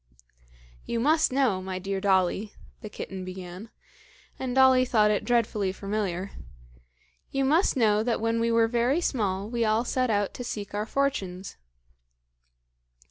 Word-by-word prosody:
"You 235 - -3
must 310 +5 +3
know, 255 -8 +1
my 185 0 -5
dear 195 +1 -3
Dolly," 190 +1 +1 0.3
the 215 - -7
kitten 190 -2 -7
began 185 +3 -8 0.7
and 255 -1 -3
Dolly 260 -1 +6
thought 215 -4 +3
it 210 - 0
dreadfully 220 -5 +1
familiar 195 -1 -3 1.0
"you 270 0 0
must 310 +2 +2
know 215 -3 +3
that 230 +1 0
when 230 +1 0
we 230 0 +1
were 230 0 +4
very 240 +6 +1
small 205 - -1
we 235 +1 -1
all 220 +2 +1
set 255 0 0
out 205 -2 0
to 245 - -6
seek 210 -4 -6
our 210 +1 -2
fortunes." 195 -10 -2
215 Hz, 145 wpm, -27 LUFS, 195-245 Hz, 1.0 s, Dolly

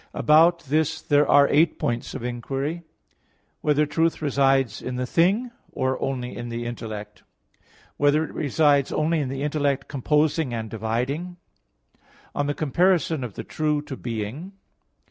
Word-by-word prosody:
About 165 +3 +5
this 155 +2 0
there 145 -1 +2
are 145 0 +6
eight 155 +2 +3
points 120 0 -3
of - - -6
inquiry: 135 +6 -3
(1) 170 - -15 0.8
Whether 150 0 +2
truth 165 +3 0
resides 135 -6 +1
in 125 - -4
the 125 0 -2
thing, 195 - +2 0.2
or 130 0 -1
only 125 -2 -3
in 120 - -6
the 120 0 -4
intellect? 110 -3 -6 0.4
(2) - - -38 0.3
Whether 145 +2 +3
it - - -7
resides 145 -2 +2
only 160 +2 +1
in 140 -3 -2
the 135 +1 -4
intellect 145 -2 0
composing 150 -1 0
and 110 -2 -5
dividing? 125 - -3 0.6
(3) - - -37 0.3
On 145 - -1
the 145 - -1
comparison 160 0 +1
of 115 -6 -6
the - - -5
true 150 -1 -1
to 140 - -7
being. 120 - -5
145 Hz, 160 wpm, -24 LUFS, 125-155 Hz, 0.8 s, are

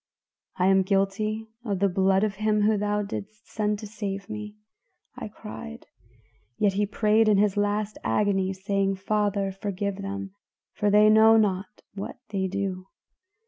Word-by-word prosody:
'I 180 - +2
am 190 0 +5
guilty 200 +3 0 0.2
of 205 -5 -2
the 200 +2 +2
blood 190 +1 +2
of 205 -2 -1
him 215 0 +1
whom 210 0 +3
thou 210 0 0
didst 210 +2 -7
send 210 -1 0
to 215 - -8
save 200 -1 -5
me,' 210 -1 -7 0.6
I - - -6
cried, 135 - -9 0.7
'yet 205 -2 +2
he 205 +1 0
prayed 215 +1 +2
in 210 - +4
his 205 -1 +2
last 205 +1 -1
agony, 190 - +1
saying, 195 0 -1
Father, 200 0 0
forgive 200 0 -3
them, 195 0 -5 0.4
for 205 - 0
they 210 +1 +6
know 220 +1 +7
not 205 -1 -1
what 200 +5 -6
they 195 -2 -1
do. 190 -1 -3
205 Hz, 155 wpm, -26 LUFS, 195-210 Hz, 0.7 s, know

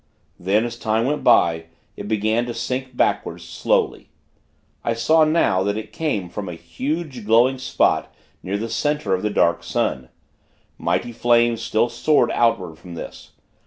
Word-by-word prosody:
Then, 100 +5 +1
as 120 0 -6
time 110 +1 0
went 150 +3 -1
by, 80 -1 +4 0.3
it 100 - -7
began 110 +3 0
to 120 - -5
sink 125 +2 -4
backward, - - 0
slowly. - - -1 0.7
I 115 - 0
saw, 155 +8 +4
now, 155 - +2
that 100 +2 -1
it 110 - -7
came 145 - -2
from 95 +2 -6
a 85 - -6
huge, 130 - -4
glowing 120 +5 +3
spot 130 - +1 0.3
near 100 +2 -3
the 110 +3 -3
center 145 -5 -1
of 95 - 0
the 105 - 0
Dark 85 -4 +2
Sun. 65 -1 -2 0.7
Mighty 120 - -1
flames, 120 0 +2
still 110 +2 +1
soared 120 +1 +2
outward 95 -9 +1
from 90 -2 -10
this. - - -9
115 Hz, 160 wpm, -21 LUFS, 100-125 Hz, 0.7 s, by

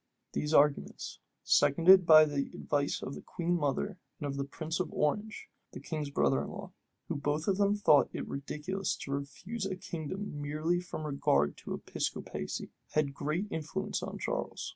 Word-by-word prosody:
These 150 - -1
arguments, 145 -2 +2 0.2
seconded 175 +4 +6
by 155 -1 +10
the 145 -2 -2
advice 145 -1 -1
of 135 - -4
the - - -7
queen 175 0 -2
mother 170 +4 -1 0.2
and 150 - -4
of 140 -1 -2
the 140 - -1
prince 160 +4 -4
of 185 - -1
Orange, 210 +9 -1 0.3
the - - -6
king's 155 -3 -4
brother 135 -1 +2
in - - -5
law, 195 -3 -8 0.4
who 170 - -2
both 145 +2 -1
of 195 -2 +2
them 205 0 +3
thought 155 -8 +5
it - - -5
ridiculous 160 +7 -3
to 140 - -7
refuse 185 +10 -4
a 190 - -3
kingdom 180 -2 -5
merely 155 +4 0
from 175 -3 -6
regard 75 - +2
to - - -5
Episcopacy, - - -4 0.2
had 150 -2 +1
great 155 +8 -1
influence 190 +6 -3
on - - -5
Charles. - - -3
155 Hz, 170 wpm, -31 LUFS, 145-185 Hz, 0.4 s, by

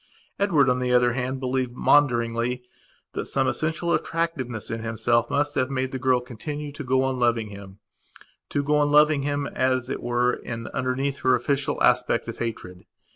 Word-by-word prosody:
Edward, 165 -9 +3
on 125 0 +2
the 125 0 -1
other 125 -1 +4
hand, 130 +1 -2
believed 130 -1 -1
maunderingly 125 -3 +2 0.5
that - - -4
some - - +1
essential 165 +2 0
attractiveness 140 -10 -2
in 115 -1 -3
himself 115 +1 +1
must 145 0 0
have 130 -2 0
made 130 -1 -2
the 130 - -4
girl 130 -1 +3
continue 145 +5 -6
to 145 +1 -7
go 130 0 +2
on 130 -1 -1
loving 115 -3 +1
himto 100 +7 -9
go 150 +1 +2
on 145 0 +2
loving 150 -1 +5
him, 145 0 -1
as 130 -1 0
it - - -4
were, 120 +1 +1
in 115 -1 -6
underneath 135 +2 -1
her 130 -1 +3
official 140 +3 -1
aspect - - +2
of - - -6
hatred. 90 -6 -5
130 Hz, 175 wpm, -25 LUFS, 120-145 Hz, 0.5 s, loving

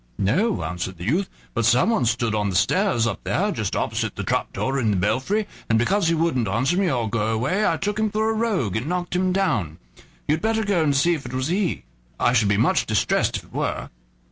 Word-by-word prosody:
"No," 190 - +1
answered 90 +2 -4
the 85 - -8
youth; 170 - 0 0.2
"but 115 - 0
someone 125 - +3
stood 115 -1 0
on 105 -1 0
the 95 - -3
stairs 115 +5 +2
up 115 - -3
there - - 0
just - - -3
opposite - - -2
the - - -4
trap - - -1
door 135 +1 -1
in 115 -4 +1
the 100 - +1
belfry, 130 - 0 0.2
and 115 - +3
because 170 - +2
he 165 - +2
wouldn't 155 -9 0
answer 130 - +1
me, 190 -1 +2
or 120 -5 0
go 110 0 -1
away, 135 - +1
I - - +1
took 205 +1 -2
him 215 0 +1
for 220 +2 0
a - - 0
rogue 210 - 0
and 110 +6 -2
knocked 180 +1 -2
him 185 +1 +1
down. 130 - 0 0.5
You'd 155 +2 +1
better 220 0 +1
go 200 -5 +1
and 145 -3 +2
see 170 +5 +3
if 145 -6 -5
it 120 - -8
was 130 +3 -1
he; 185 0 -1 0.4
I 120 - +3
should 110 -4 +3
be 100 - +2
much 110 - +2
distressed - - +1
if - - -9
it - - -21
were." - - -2
135 Hz, 235 wpm, -23 LUFS, -, 0.5 s, someone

